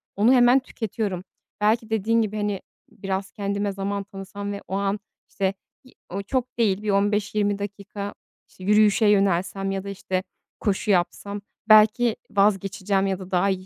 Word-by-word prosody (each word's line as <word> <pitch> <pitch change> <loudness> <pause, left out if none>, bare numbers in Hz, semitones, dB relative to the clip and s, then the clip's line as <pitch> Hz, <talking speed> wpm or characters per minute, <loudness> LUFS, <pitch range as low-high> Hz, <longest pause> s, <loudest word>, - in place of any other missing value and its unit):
onu 220 +6 +5
hemen 245 +1 +6
tüketiyorum. 215 -7 -4 0.4
Belki 220 +1 +2
dediğin 225 +1 +2
gibi, 215 -1 -2
hani, 205 -2 -1 0.3
biraz 195 0 -4
kendime 200 0 -2
zaman 200 +1 -3
tanısam 200 0 -7
ve 200 - -5
o 190 - -3
an 200 +1 0 0.3
işte, 195 -1 -1 0.3
ııı, 255 - -18 0.3
o - - -4
çok 255 +4 -2
değil, 205 -4 +2
bir 215 - -2
15-20 205 0 +1
dakika, 200 0 -6 0.4
işte, 185 - -14
yürüyüşe 210 +2 +4
yönelsem 195 -1 +2
ya 195 -1 -3
da, 200 - -6
işte, 190 -1 -2 0.4
koşu 205 0 0
yapsam 200 +2 0 0.3
belki 215 +2 +6 0.2
vazgeçeceğim 195 -1 +1
ya 190 -1 -1
da 185 -1 -10
daha 185 +2 +3
iyi 185 -1 -2
200 Hz, 160 wpm, -24 LUFS, 195-215 Hz, 0.4 s, hemen